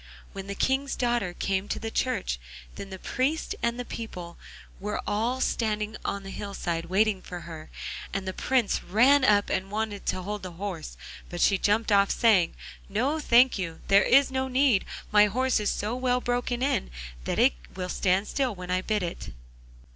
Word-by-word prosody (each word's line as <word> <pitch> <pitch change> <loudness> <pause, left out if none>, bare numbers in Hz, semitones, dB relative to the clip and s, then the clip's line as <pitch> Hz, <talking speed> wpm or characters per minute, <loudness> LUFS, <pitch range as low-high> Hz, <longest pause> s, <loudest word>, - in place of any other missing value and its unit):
When 195 0 -7
the 200 - -4
King's 270 +5 0
daughter 240 -6 0
came 195 0 -1
to - - -2
the 225 0 -5
church 60 - -1 0.3
the 190 -1 -7
priest 270 +10 -1
and 235 +1 -1
people 180 -7 -7 0.4
were 210 +2 -3
all 230 +5 0
standing 215 -1 -1
on 200 0 -3
the 195 - -7
hillside 175 -5 -3
waiting 200 +1 +2
for 180 -1 -7
her, 160 -2 -9 0.4
and 195 0 -3
the 185 - -2
Prince 255 -2 +1
ran 260 +9 +5
up 205 -4 +4
and 190 +1 -1
wanted 210 -1 -3
to 185 - -1
hold 205 +2 -4
the 185 -2 -7
horse, 180 -3 -6 0.3
but 175 - -6
she 195 +2 +4
jumped 210 +3 +2
off, 200 -1 +5
saying: 200 -8 +3 0.3
'No, 260 +10 0
thank 245 -5 +5
you, 165 -3 -4
there 200 +1 +7
is 275 +1 +5
no 265 0 -1
need; 260 -5 +3 0.3
my 210 0 +6
horse 255 +4 +1
is 210 - 0
so 215 +4 -2
well 250 0 +1
broken 245 0 -1
in 265 - 0 0.4
that - - -1
it - - +5 0.2
will 180 -1 -3
stand 190 +2 +1
still 260 -6 -1
when 180 -1 -6
I 185 0 +1
bid 210 0 -1
it. 170 - -5
210 Hz, 180 wpm, -27 LUFS, 190-245 Hz, 0.4 s, there